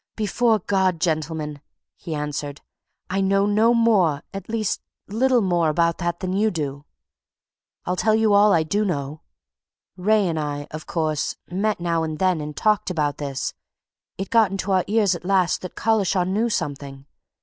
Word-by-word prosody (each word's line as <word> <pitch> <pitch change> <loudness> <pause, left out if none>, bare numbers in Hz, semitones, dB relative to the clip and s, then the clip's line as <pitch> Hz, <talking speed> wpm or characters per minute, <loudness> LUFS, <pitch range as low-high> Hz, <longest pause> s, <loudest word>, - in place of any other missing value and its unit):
"Before 220 +2 +2
God, 190 -3 0
gentlemen!" 155 -3 -2 0.3
he 165 -4 -6
answered. 145 -1 -4 0.5
"I 195 +1 +1
know 195 +1 +2
no 215 +3 +3
more 195 -11 +3
at 195 0 -7
least, 220 -2 -1 0.3
little 245 +4 +2
more 175 -4 +2
about 170 +2 +1
that 175 -1 -2
than 185 -1 -2
you 210 +3 +2
do! 145 -6 -4 1.0
I'll 180 - -1
tell 215 +3 +2
you 220 -1 +3
all 205 +1 +6
I 165 -4 +3
do 205 +7 0
know. 150 -5 -3 0.8
Wraye 205 +2 +2
and 160 -2 -1
I, 145 -1 -3
of 155 0 -8
course, 155 -3 -1 0.2
met 205 +3 0
now 170 -1 0
and 155 -1 -3
then 185 -3 +1
and 150 0 -7
talked 215 -2 +2
about 150 -5 -1
this. 140 -2 -3 0.6
It 195 - -5
got 215 -4 +3
to 195 +1 -3
our 185 -1 +3
ears 205 -2 +3
at 175 - -6
last 185 -1 +1
that 185 - -8
Collishaw 200 -4 +1
knew 205 +6 0
something. 140 -7 -4
185 Hz, 170 wpm, -23 LUFS, 155-205 Hz, 1.0 s, all